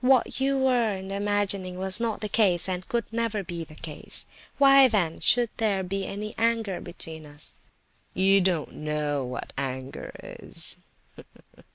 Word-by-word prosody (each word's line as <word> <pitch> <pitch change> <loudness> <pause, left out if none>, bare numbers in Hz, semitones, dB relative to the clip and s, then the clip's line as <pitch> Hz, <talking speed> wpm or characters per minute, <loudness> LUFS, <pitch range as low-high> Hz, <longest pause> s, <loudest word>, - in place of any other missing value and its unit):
What 260 0 +3
you 275 0 +2
were 245 -5 +2
then 190 0 -7
imagining 200 -2 -1
was 190 +1 +1
not 230 -3 -2
the 210 - -2
case, 195 -5 +2
and 185 -1 -3
could 235 -1 0
never 225 -3 -1
be 170 -2 -5
the 155 -1 -13
case. 155 -1 +1 0.3
Why, 275 -1 +7
then, 190 -9 0
should 240 0 +2
there 205 -4 +1
be 195 +1 -3 0.3
anger 225 -4 0
between 160 -2 -9
us?" 145 0 -2 0.6
"You 195 +1 +5
don't 180 -4 0
know 150 -2 -2
what 125 0 -6
anger 130 -1 -5
is!" - - +2
195 Hz, 150 wpm, -26 LUFS, 165-225 Hz, 0.6 s, Why